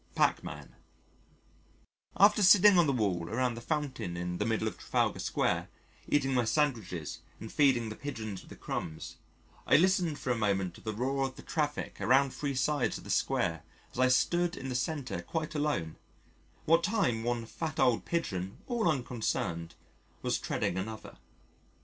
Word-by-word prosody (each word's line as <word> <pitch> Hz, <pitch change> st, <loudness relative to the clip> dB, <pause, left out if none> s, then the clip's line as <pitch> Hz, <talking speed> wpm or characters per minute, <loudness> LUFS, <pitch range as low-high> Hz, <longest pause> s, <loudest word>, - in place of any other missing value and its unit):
Pachmann -, -, 0 dB, 1.4 s
After 210 Hz, +1 st, +6 dB
sitting 200 Hz, 0 st, +7 dB
on 170 Hz, -, +4 dB
the -, -, +3 dB
wall 95 Hz, -9 st, 0 dB
around 125 Hz, +2 st, 0 dB
the 115 Hz, -, -7 dB
fountain 130 Hz, -, -3 dB
in 90 Hz, 0 st, -3 dB
the 105 Hz, -, 0 dB
middle 110 Hz, -1 st, 0 dB
of 110 Hz, -, -5 dB
Trafalgar -, -, 0 dB
Square, -, -, 0 dB, 0.4 s
eating 135 Hz, -2 st, +2 dB
my 125 Hz, -2 st, +3 dB
sandwiches 110 Hz, -, -1 dB, 0.2 s
and 110 Hz, -, -8 dB
feeding 130 Hz, -6 st, +3 dB
the 110 Hz, -, -6 dB
Pigeons 110 Hz, -9 st, -5 dB
with -, -, -17 dB
the -, -, -10 dB
crumbs, 80 Hz, -1 st, -5 dB, 0.5 s
I -, -, +7 dB
listened 175 Hz, -2 st, +2 dB
for 130 Hz, -, -2 dB
a -, -, +2 dB
moment 100 Hz, -4 st, 0 dB
to -, -, -14 dB
the 110 Hz, -, -3 dB
roar 135 Hz, +3 st, 0 dB
of 130 Hz, -, -11 dB
the -, -, -11 dB
traffic 150 Hz, -8 st, -2 dB
around 130 Hz, +6 st, +4 dB
three 140 Hz, -2 st, -3 dB
sides 145 Hz, +1 st, +1 dB
of -, -, -12 dB
the -, -, -5 dB
Square 80 Hz, -3 st, +1 dB, 0.3 s
as -, -, -8 dB
I 130 Hz, -, +5 dB
stood 175 Hz, +7 st, +2 dB
in 135 Hz, -, -5 dB
the -, -, -2 dB
centre 130 Hz, -, -2 dB
quite 155 Hz, -, -4 dB
alone, 145 Hz, -, -1 dB, 0.7 s
what 165 Hz, +2 st, +4 dB
time 125 Hz, -, +1 dB
one 120 Hz, -1 st, -1 dB
fat 155 Hz, +6 st, -5 dB
old 125 Hz, -3 st, +3 dB
pigeon, 95 Hz, -, -3 dB
all 235 Hz, -7 st, +1 dB
unconcerned, 110 Hz, -, -2 dB, 0.5 s
was -, -, 0 dB
treading 90 Hz, -, -1 dB
another. 110 Hz, +3 st, -7 dB
125 Hz, 170 wpm, -31 LUFS, 110-150 Hz, 1.4 s, sitting